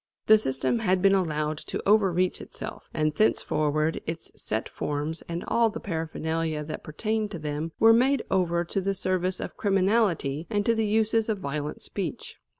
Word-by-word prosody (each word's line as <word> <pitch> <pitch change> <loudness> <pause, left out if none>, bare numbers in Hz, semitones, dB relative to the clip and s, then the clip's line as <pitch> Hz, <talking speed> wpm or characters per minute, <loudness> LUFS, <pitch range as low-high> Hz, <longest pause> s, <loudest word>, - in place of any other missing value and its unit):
The 215 0 +7
system 135 - 0
had 190 -4 +2
been 195 0 +6
allowed 155 -5 0
to - - -5
overreach 190 -4 +3
itself, - - -8
and 155 -1 0
thenceforward 155 -5 +1
its 165 +1 -5
set 110 +1 -2
forms 150 +2 -3
and 170 +1 -3
all 230 -1 +3
the 225 +2 -6
paraphernalia 160 -2 -2
that 155 +1 -6
pertained 215 +7 -2
to 190 - -6
them 150 +1 -3
were 225 0 +7
made 255 +2 +3
over 175 -2 +1
to 195 +3 -2
the 195 +1 -1
service 185 -1 0
of - - -6
criminality 190 -7 +1
and 205 -2 0
to 230 - +4
the 220 -1 0
uses 220 +1 +2
of 215 - +1
violent 150 -3 -4
speech. 180 -8 -5
180 Hz, 170 wpm, -27 LUFS, 155-210 Hz, -, The